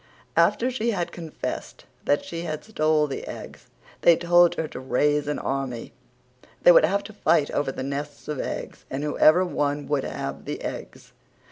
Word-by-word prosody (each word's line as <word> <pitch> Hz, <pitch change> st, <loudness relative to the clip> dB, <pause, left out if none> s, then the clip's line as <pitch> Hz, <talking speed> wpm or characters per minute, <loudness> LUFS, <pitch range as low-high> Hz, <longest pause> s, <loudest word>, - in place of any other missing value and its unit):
After 250 Hz, +2 st, +3 dB
she 235 Hz, -2 st, -1 dB
had 180 Hz, -6 st, -1 dB
confessed 165 Hz, -3 st, -6 dB, 0.2 s
that 145 Hz, -, +2 dB
she 165 Hz, 0 st, -5 dB
had 155 Hz, -3 st, -4 dB
stole 155 Hz, -7 st, +2 dB
the 140 Hz, -, -5 dB
eggs -, -, -9 dB, 0.3 s
they 170 Hz, -, +7 dB
told 175 Hz, 0 st, +5 dB
her 160 Hz, -, -2 dB
to -, -, -8 dB
raise 145 Hz, +3 st, +1 dB
an 150 Hz, -, -1 dB
army. 135 Hz, -4 st, -3 dB, 0.7 s
They -, -, +9 dB
would 165 Hz, -, +7 dB
have 200 Hz, +5 st, 0 dB
to 215 Hz, -, -10 dB
fight 160 Hz, -6 st, +2 dB
over 145 Hz, -2 st, 0 dB
the 130 Hz, -, -5 dB
nests 140 Hz, +2 st, -5 dB
of 150 Hz, -3 st, -3 dB
eggs -, -, -5 dB
and 135 Hz, +2 st, -3 dB
whoever 155 Hz, +4 st, +4 dB
one 145 Hz, -4 st, -1 dB
would 145 Hz, -2 st, +1 dB
have 70 Hz, +2 st, -5 dB
the -, -, -5 dB
eggs. -, -, -7 dB
150 Hz, 175 wpm, -25 LUFS, 145-175 Hz, 0.7 s, They